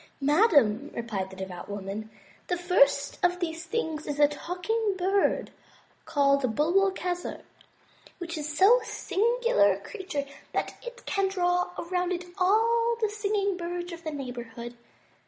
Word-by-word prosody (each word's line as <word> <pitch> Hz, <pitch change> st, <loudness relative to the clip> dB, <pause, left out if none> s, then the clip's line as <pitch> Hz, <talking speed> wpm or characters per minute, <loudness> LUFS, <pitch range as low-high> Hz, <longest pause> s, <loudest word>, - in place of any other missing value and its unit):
*' -, -, -36 dB
"Madame," 285 Hz, -, +4 dB
replied 210 Hz, -5 st, -3 dB
the 190 Hz, -, -11 dB
devout 190 Hz, -1 st, -7 dB
woman, 205 Hz, +2 st, -5 dB, 0.4 s
"the 355 Hz, -, 0 dB
first 285 Hz, -6 st, +3 dB
of 355 Hz, 0 st, +3 dB
these 330 Hz, -1 st, -3 dB
three 460 Hz, +7 st, -1 dB
things 310 Hz, -4 st, -5 dB
is 290 Hz, -, -3 dB
the 290 Hz, 0 st, +6 dB
Talking 365 Hz, +8 st, -2 dB
Bird 385 Hz, +2 st, +1 dB, 0.5 s
called 275 Hz, -5 st, +2 dB
Bul 305 Hz, +4 st, +2 dB
bul 390 Hz, 0 st, +5 dB
ke'zer, 360 Hz, -2 st, -4 dB, 0.7 s
which 345 Hz, -1 st, -5 dB
is 305 Hz, -1 st, -4 dB
so 435 Hz, +6 st, +7 dB
singular 445 Hz, -, +2 dB
a 190 Hz, -, -6 dB
creature 305 Hz, -, -5 dB, 0.3 s
that -, -, -1 dB
it 485 Hz, 0 st, -9 dB
can 395 Hz, -1 st, +1 dB
draw 360 Hz, -2 st, +1 dB
around 360 Hz, +1 st, -1 dB
it 360 Hz, 0 st, -2 dB
all 460 Hz, +5 st, +3 dB
the 435 Hz, -2 st, +1 dB
singing 405 Hz, -2 st, 0 dB
birds 350 Hz, 0 st, -4 dB
of 335 Hz, 0 st, -9 dB
the 315 Hz, -, -3 dB
neighborhood. 240 Hz, -4 st, -6 dB
350 Hz, 155 wpm, -28 LUFS, 280-390 Hz, 0.7 s, so